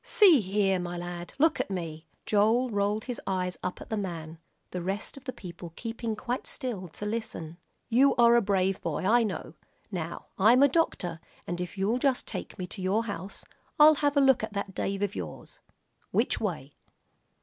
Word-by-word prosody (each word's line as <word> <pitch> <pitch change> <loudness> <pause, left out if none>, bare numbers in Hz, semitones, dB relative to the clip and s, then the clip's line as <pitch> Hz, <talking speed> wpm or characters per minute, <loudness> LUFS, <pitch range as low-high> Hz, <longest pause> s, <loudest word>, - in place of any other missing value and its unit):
"See 370 -9 +6
here, 195 -1 +1
my 175 0 -4
lad, 175 0 -6
look 315 +2 +3
at - - -1
me." 165 -4 -5 0.2
Joel 225 +4 +3
rolled 205 +1 0
his 245 -3 -5
eyes 180 -1 -1
up 180 - -4
at - - -11
the 220 - 0
man, 165 -5 -5 0.3
the 180 - -3
rest 195 +4 -3
of 275 - -13
the 255 - -3
people 175 -7 -9
keeping 230 -1 -4
quite 245 +4 -3
still 230 -10 -2
to 190 +5 -8
listen. 205 -7 -4 0.3
"You 265 +4 +4
are 235 0 +6
a 235 - +5
brave 195 -2 +1
boy, 165 0 -2
I 235 +5 +5
know. 195 -8 -3 0.4
Now 170 -3 -4
I'm 235 +7 +6
a - - +8
doctor, 220 - 0 0.3
and 175 +1 -3
if 180 +3 -6
you'll 210 +6 +1
just 265 -1 +1
take - - -6
me 185 - -3
to 190 +2 -5
your 195 +5 +1
house, 200 -3 -6 0.3
I'll 305 +1 +9
have 290 0 +2
a - - +6
look 265 -2 +5
at 220 - -4
that 200 -1 -3
Dave 195 +2 -2
of 200 -1 -1
yours. - - -7 0.5
Which - - +1
way?" - - -4
205 Hz, 195 wpm, -28 LUFS, 180-240 Hz, 0.5 s, I'll